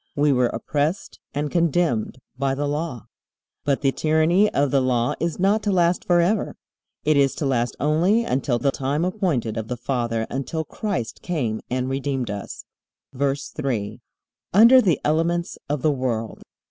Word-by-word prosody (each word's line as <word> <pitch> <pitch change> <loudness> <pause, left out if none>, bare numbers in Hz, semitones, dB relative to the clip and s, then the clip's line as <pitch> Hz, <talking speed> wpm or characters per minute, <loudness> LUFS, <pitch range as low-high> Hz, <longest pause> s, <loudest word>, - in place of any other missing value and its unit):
We 145 0 +3
were 125 -2 +3
oppressed 150 +8 -2
and 145 +1 -3
condemned 165 -9 +1 0.2
by 135 -1 0
the 145 +1 -2
Law. 145 -5 -3 0.6
But 140 -2 0
the 135 -2 +2
tyranny 160 +8 +2
of 140 -1 +1
the 140 - +3
Law 125 -2 +1
is 170 -2 -2
not 200 +4 +2
to 205 - 0
last 175 -1 +2
forever. 175 +4 +2 0.5
It 155 -1 +3
is 140 -1 +3
to 150 - -3
last 120 -3 0
only 175 +10 +2
until 130 - 0
"the 135 +3 +1
time 140 +5 -1
appointed 170 - -1
of 110 -1 -3
the 125 - -4
father," 120 -2 -1
until 140 +4 -3
Christ 185 - -4
came 125 -11 -2
and 125 0 -1
redeemed 135 -3 -2
us. 100 -1 -7 0.5
VERSE 140 +1 -1
3. 125 -9 -3 0.6
Under 235 +5 +8
the 175 - +2
elements 170 +3 0
of 145 -2 -2
the 155 - +4
world. 120 -5 -3
145 Hz, 160 wpm, -23 LUFS, 125-170 Hz, 0.6 s, Under